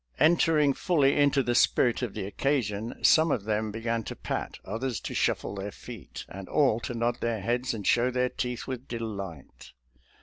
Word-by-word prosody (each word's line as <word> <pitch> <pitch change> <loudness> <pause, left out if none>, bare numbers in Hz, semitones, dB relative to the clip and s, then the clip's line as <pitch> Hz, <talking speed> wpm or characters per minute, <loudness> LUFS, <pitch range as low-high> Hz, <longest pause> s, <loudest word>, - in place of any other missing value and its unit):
En 165 +2 +6
tering 150 -5 +3
fully 145 -7 +2
into 140 -1 +3
the 120 - 0
spirit 120 0 +3
of 120 -5 -3
the 105 -3 -3
occasion, 110 -1 -1
some 160 +1 +6
of 110 - 0
them 110 0 -1
began 115 +2 -2
to - - -7
pat, - - -4
others 115 +4 -3
to - - -6
shuffle - - 0
their 100 0 -4
feet, 115 -4 -9
and 95 0 -9
all 135 -7 +3
to 120 - -5
nod 120 +1 0
their 115 -2 -1
heads 120 +5 0
and 105 -4 -5
show 120 +1 +3
their 125 0 0
teeth 125 -1 -4
with 130 -1 -6
delight. 100 - -7
120 Hz, 190 wpm, -28 LUFS, 110-130 Hz, -, En